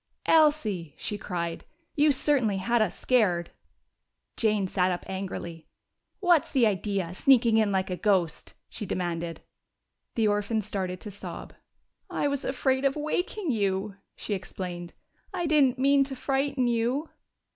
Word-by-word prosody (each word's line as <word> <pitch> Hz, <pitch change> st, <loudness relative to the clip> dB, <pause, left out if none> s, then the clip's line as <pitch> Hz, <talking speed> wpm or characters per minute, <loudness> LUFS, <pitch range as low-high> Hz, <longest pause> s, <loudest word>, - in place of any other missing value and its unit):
"Elsie!" 230 Hz, -, +3 dB
she 210 Hz, -, -3 dB
cried. 170 Hz, -4 st, -4 dB, 0.3 s
"You 295 Hz, 0 st, +5 dB
certainly 260 Hz, -7 st, +1 dB
had 235 Hz, +5 st, +1 dB
us 215 Hz, -, 0 dB
scared!" 185 Hz, -9 st, +2 dB, 0.8 s
Jane 210 Hz, -4 st, +1 dB
sat 185 Hz, 0 st, +1 dB
up 180 Hz, -1 st, -2 dB
angrily. 185 Hz, -4 st, -6 dB, 0.5 s
"What's 350 Hz, -6 st, +3 dB
the 260 Hz, -4 st, +4 dB
idea, 195 Hz, -4 st, -1 dB
sneaking 235 Hz, +1 st, +4 dB
in 215 Hz, -2 st, +3 dB
like 190 Hz, -1 st, 0 dB
a -, -, 0 dB
ghost?" 185 Hz, -6 st, 0 dB
she 225 Hz, -, -7 dB
demanded. 170 Hz, -2 st, -3 dB, 0.7 s
The 225 Hz, -2 st, +2 dB
orphan 210 Hz, +2 st, 0 dB
started 190 Hz, -3 st, -4 dB
to 210 Hz, -, -7 dB
sob. 200 Hz, -, -8 dB, 0.6 s
"I -, -, 0 dB
was 280 Hz, -1 st, -2 dB
afraid 265 Hz, 0 st, 0 dB
of 275 Hz, -1 st, +2 dB
waking 325 Hz, +4 st, -2 dB
you," 200 Hz, -2 st, -1 dB, 0.2 s
she 210 Hz, -, -4 dB
explained. 180 Hz, -2 st, -6 dB, 0.4 s
"I 350 Hz, -, -1 dB
didn't 285 Hz, -5 st, +3 dB
mean 275 Hz, +1 st, +4 dB
to 270 Hz, 0 st, -5 dB
frighten 270 Hz, 0 st, 0 dB
you." 240 Hz, +6 st, 0 dB
215 Hz, 140 wpm, -27 LUFS, 185-270 Hz, 0.8 s, You